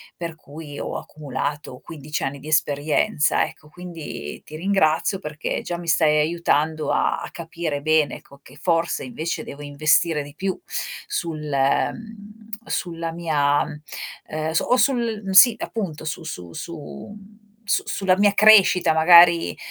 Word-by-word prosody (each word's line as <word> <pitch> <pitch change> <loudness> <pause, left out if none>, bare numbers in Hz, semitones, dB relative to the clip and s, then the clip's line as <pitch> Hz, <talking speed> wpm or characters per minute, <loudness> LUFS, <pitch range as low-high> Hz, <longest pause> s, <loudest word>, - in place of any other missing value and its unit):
per 170 -2 -6
cui 150 -1 -10
ho - - -5
accumulato 145 -2 -5
15 150 -1 -6
anni 135 +1 -3
di 145 - -12
esperienza 155 +3 +1
ecco, 155 - -13
quindi 165 - -8
ti 155 - -10
ringrazio 185 +1 +1
perché 150 -2 -4
già 175 - -4
mi 170 0 -9
stai 155 -2 +3
aiutando 155 -1 0
a - - +1
a - - -7
capire 165 -3 -5
bene 155 0 +1
co 140 - -18
che - - -17
che 145 - -16
forse 170 0 0
invece 155 +6 -4
devo 145 +1 -9
investire 150 +2 +2
di 145 0 -12
più 190 +3 -2 0.5
sul, 165 - -3
mhmm, 210 - -2 0.2
sulla 165 -1 -3
mia, 150 -4 +1 0.6
ehm, 155 +1 -3
su 160 - +1
o 250 - +2
sul 230 -5 0
sì 235 +3 +9
appunto, 170 -9 -5
su 155 +1 -4
su 90 - -8
su 170 - -8 0.5
su 200 - +1
sulla 190 -2 +1
mia 205 0 +4
crescita 205 -4 +6
magari, 170 +1 +6
160 Hz, 145 wpm, -22 LUFS, 150-180 Hz, 0.6 s, sì